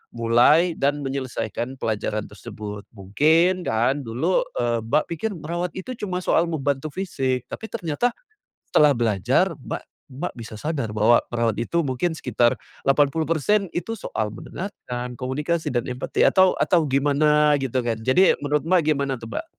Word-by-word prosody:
mulai 125 +9 +4
dan 145 +1 +1
menyelesaikan 130 -2 -4
pelajaran 110 -1 -1
tersebut? 105 0 -8
Mungkin 160 - +2
kan 120 +6 +1
dulu, 130 +11 0
eee, 120 -1 +1
Mbak 145 +7 +2
pikir 185 +7 -2
merawat 170 +2 -4
itu 190 +7 -6
cuma 185 -4 -3
soal 170 - +3
membantu 145 -2 -2
fisik, 135 -9 -2
tapi 220 - -6
ternyata 215 +3 -1 0.6
setelah 150 -2 +5
belajar 120 - +2
Mbak - - -5 0.3
Mbak 140 +4 -5
bisa 110 -2 -9
sadar 140 -9 -2
bahwa 110 +3 +4
perawat 115 -3 0
itu 120 +9 0
mungkin 150 +3 -1
sekitar 120 -5 +1 0.3
80% 160 +7 +2
itu 225 +6 -3
soal 110 - -3
mendengarkan, 125 - -6
komunikasi 150 +6 -2
dan 120 -2 -1
empati, 125 +1 -3
atau 185 -1 +5
atau 170 -3 +3
gimana 145 +2 +3
gitu 130 -2 -1
kan? 120 -2 -1
Jadi 130 +12 +3
menurut 145 +1 +1
Mbak 185 -2 +4
gimana 140 -2 -1
tuh, 115 - -10
Mbak? - - -3
140 Hz, 145 wpm, -23 LUFS, 120-165 Hz, 0.6 s, setelah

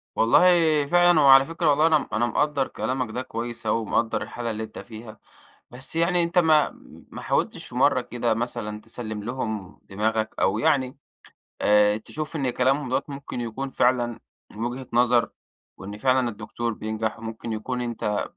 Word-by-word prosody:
والله 160 +4 +4
فعلًا 175 0 +5
وعلى 135 -1 +8
فكرة 165 +1 0
والله 150 +2 +4
أنا 155 -3 +2
أنا 110 +2 +2
مقدر 140 +2 0
كلامك 125 0 -3
ده 125 +3 -3
كويس 120 -1 -6
أوي 110 +1 +1
ومقدر 110 +1 0
الحالة 120 -1 -4
اللي 110 0 -4
أنت 110 - -9
فيها، 110 -1 -11 0.5
بس 130 +5 -6
يعني 170 +1 +2
أنت 170 +2 0
ما 155 -3 +4 0.4
ما - - -8
حاولتش - - -1
في - - -13
مرة - - +3
كده 120 -1 -1
مثلًا 105 -2 -4
تسلِّم 110 -1 -6
لهم 110 -5 -5
دماغك، 110 +2 -2
أو 100 +3 +2
يعني 130 +2 +1 0.6
آآ، 105 0 +4
تشوف 155 +8 -6
إن 135 -4 0
كلامهم 130 +3 +1
دوَّة 130 +2 0
ممكن 140 -3 -6
يكون 120 +4 -4
فعلًا 120 -3 +1 0.3
من 110 +2 -5
وجهة 125 +2 -4
نظر، 120 0 +3 0.5
وإن 100 +2 -8
فعلًا 130 0 +2
الدكتور 115 +2 -4
بينجح 110 0 -4
وممكن 115 0 -6
يكون 125 +3 -3
أنت 115 -4 -2
120 Hz, 165 wpm, -24 LUFS, 110-135 Hz, 0.6 s, وعلى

